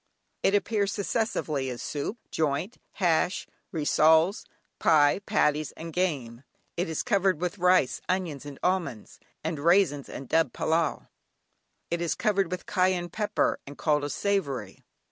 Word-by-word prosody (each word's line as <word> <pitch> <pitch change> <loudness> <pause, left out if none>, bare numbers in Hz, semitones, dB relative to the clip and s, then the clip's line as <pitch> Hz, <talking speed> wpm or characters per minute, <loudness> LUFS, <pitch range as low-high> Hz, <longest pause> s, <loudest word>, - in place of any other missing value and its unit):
It 195 - +3
appears 205 -1 +1
successively 200 - -1
as 125 -1 -5
soup, 150 +10 -4
joint, 155 - -1 0.2
hash, 180 0 +1 0.3
rissoles, 160 +4 +3 0.3
pie, 150 +2 +4
patties 150 -7 +1
and 165 0 -8
game. 140 -10 -1 0.3
It 175 -1 -1
is 160 - -2
covered 190 -5 +2
with 180 +3 -3
rice, 180 -6 +3
onions, 180 -7 -1
and 145 -2 -9
almonds, 180 - -2 0.2
and 160 -1 -2
raisins, 165 -3 +3
and 135 - -7
dubbed 165 +4 +1
"pillau"; 160 -1 0 0.9
it 170 0 -1
is 170 - 0
covered 195 -4 +1
with 180 0 -5
cayenne 185 -2 +1
pepper 210 +3 0
and 140 - -9
called 150 -2 +1
a 145 - -2
savoury. 140 - -2
165 Hz, 140 wpm, -27 LUFS, 145-190 Hz, 0.9 s, pie